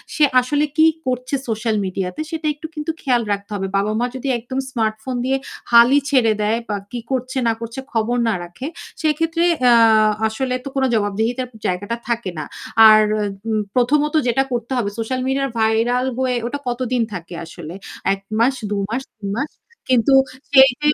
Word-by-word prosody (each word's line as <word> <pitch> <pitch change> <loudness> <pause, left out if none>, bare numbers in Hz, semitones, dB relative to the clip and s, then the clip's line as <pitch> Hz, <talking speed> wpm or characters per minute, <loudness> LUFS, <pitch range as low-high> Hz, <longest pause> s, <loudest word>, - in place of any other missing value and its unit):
সে 305 - +3 0.2
আসলে 290 +4 +1
কি 315 - +6 0.2
করছে 255 +1 -1
সোশ্যাল 220 0 0
মিডিয়াতে 185 +5 -3
সেটা 320 -1 -3
একটু 305 +2 -8
কিন্তু 300 +1 -2
খেয়াল 250 -4 +2
রাখতে 200 +1 -6
হবে। 195 -1 -2
বাবা-মা 215 +4 0
যদি 260 +2 -5
একদম 260 +3 -4
স্মার্টফোন 220 +1 -2
দিয়ে 270 +1 +1 0.3
হালই 240 +4 +7
ছেড়ে 245 -6 +4
দেয় 220 +2 +1
বা 205 - 0 0.2
কি 245 - -4
করছে 260 0 -2
না 230 - +3
করছে 230 +3 -6
খবর 230 +2 0
না 225 - +2
রাখে। 175 +11 -7 0.3
সেক্ষেত্রে 325 +2 +1 0.3
আ - - +7 0.5
আসলে 250 +4 -2
তো - - -7
কোনো 265 -1 +2
জবাবদিহিতার 220 +4 0 0.2
জায়গাটা 205 +6 -2
থাকে 230 -5 -1
না। 150 - -4 0.4
আর 215 0 +7 0.5
উ - - 0 0.2
প্রথমত 290 +4 +2
যেটা 255 +3 +2
করতে 240 +1 -3
হবে 220 -5 0
সোশ্যাল 255 +3 -2
মিডিয়া 275 +1 0
ভাইরাল 230 +3 +2
হয়ে 255 -1 +1
ওটা 285 +4 -4
কতদিন 245 0 -1
থাকে 175 -2 -7
আসলে? 165 0 -9 0.4
১ 195 - -5 0.2
মাস, 255 +4 +3
২ 205 - -1
মাস, 240 +4 -2 0.2
৩ 200 -2 -5
মাস। 280 - -2 0.4
কিন্তু 255 +1 +4 0.4
সেই 265 -1 +8
যে 300 - +2
245 Hz, 170 wpm, -20 LUFS, 220-265 Hz, 0.5 s, সেই